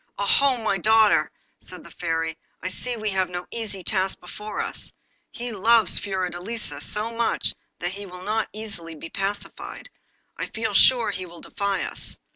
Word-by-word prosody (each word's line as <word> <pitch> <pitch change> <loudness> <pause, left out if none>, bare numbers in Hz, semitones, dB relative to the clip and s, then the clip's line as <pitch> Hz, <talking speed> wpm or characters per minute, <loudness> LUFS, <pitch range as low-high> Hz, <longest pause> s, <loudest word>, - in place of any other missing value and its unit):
'Oho! 260 +6 +4
my 215 -4 +1
daughter,' 220 +2 +5 0.3
said - - -8
the - - -13
Fairy, 165 -2 -1 0.3
'I 185 - 0
see 245 +5 -2
we 215 -1 0
have 190 -2 +1
no 180 0 -4
easy 210 -5 -3
task 190 0 +1
before 210 +4 -6
us. - - -3 0.4
He 240 0 -5
loves 220 -1 +5
Fiordelisa 190 +3 -3
so 215 +2 0
much 230 0 +1 0.2
that 175 - -2
he 200 +1 -5
will 180 0 -9
not 215 +3 0
be 215 - -6
easily 170 -7 -5 0.2
pacified. 200 - -4 0.5
I - - -2
feel 220 -1 -2
sure 240 +3 +6
he 185 0 -4
will 170 0 -12
defy 200 -1 -1
us! - - -3
200 Hz, 165 wpm, -25 LUFS, 185-225 Hz, 0.5 s, sure